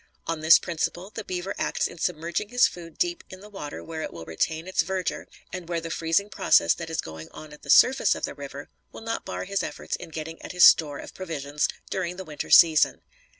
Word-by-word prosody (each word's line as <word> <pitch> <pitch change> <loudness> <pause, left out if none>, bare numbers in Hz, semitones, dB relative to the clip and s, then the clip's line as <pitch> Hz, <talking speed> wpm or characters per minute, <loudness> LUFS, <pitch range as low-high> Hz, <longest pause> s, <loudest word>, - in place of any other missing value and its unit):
On 165 -1 -2
this 160 +1 +8
principle, 175 +3 -3
the 220 - -5
beaver 185 +1 -4
acts - - 0
in 170 - -6
submerging 170 +4 -2
his 245 +1 +5
food 165 -2 -11
deep 350 -1 -1
in 185 - -10
the 210 +2 -14
water 150 -8 -7
where 160 -1 -6
it - - -5
will 85 -1 -9
retain 160 - -2
its 185 - +2
verdure 185 +1 -3 0.3
and 180 -2 -6
where 170 -1 -1
the 165 0 -6
freezing 165 +5 +1
process - - +3
that 170 -1 -7
is 160 - -1
going 80 0 -9
on 155 -1 -11
at 150 - -14
the - - -14
surface 260 +2 +5
of - - -2
the - - -6
river - - -9 0.2
will - - -10
not 225 0 -4
bar - - -4
his 195 +1 -2
efforts - - -4
in 180 - -9
getting 160 +1 -7
at - - -8
his 180 - +4
store 145 -3 +6
of - - -10
provisions 150 -5 -2 0.2
during 180 -2 -2
the 190 +1 -7
winter 150 -2 -6
season. 160 -2 +6
170 Hz, 230 wpm, -26 LUFS, 160-190 Hz, 0.3 s, this